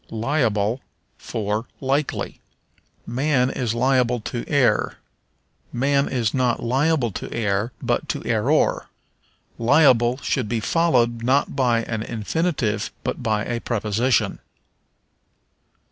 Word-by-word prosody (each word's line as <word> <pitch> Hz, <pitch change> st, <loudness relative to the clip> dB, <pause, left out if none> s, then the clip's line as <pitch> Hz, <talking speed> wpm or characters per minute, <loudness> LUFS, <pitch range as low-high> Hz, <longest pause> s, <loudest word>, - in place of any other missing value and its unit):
Liable 115 Hz, -2 st, 0 dB, 0.4 s
for 105 Hz, +2 st, -3 dB
Likely. 140 Hz, +2 st, -2 dB, 0.6 s
"Man 130 Hz, +1 st, +1 dB
is 120 Hz, -3 st, -2 dB
liable 125 Hz, -1 st, +2 dB
to 120 Hz, +2 st, -4 dB
err." 130 Hz, -7 st, +2 dB, 0.7 s
Man 140 Hz, +3 st, +1 dB
is 115 Hz, -5 st, 0 dB
not 125 Hz, -2 st, +1 dB
liable 135 Hz, 0 st, +1 dB
to -, -, -6 dB
err, 105 Hz, 0 st, -1 dB
but -, -, -1 dB
to -, -, -3 dB
error. -, -, +1 dB, 0.7 s
Liable 125 Hz, -1 st, +4 dB
should 125 Hz, -6 st, -1 dB
be 120 Hz, -, 0 dB
followed, 120 Hz, -4 st, +2 dB
not 130 Hz, +4 st, +1 dB
by 120 Hz, -3 st, +2 dB
an 110 Hz, -2 st, -3 dB
infinitive, 115 Hz, -, -1 dB
but -, -, -3 dB
by 105 Hz, -1 st, 0 dB
a 120 Hz, -1 st, -3 dB
preposition. 115 Hz, +2 st, 0 dB
120 Hz, 110 wpm, -22 LUFS, 110-135 Hz, 0.7 s, Liable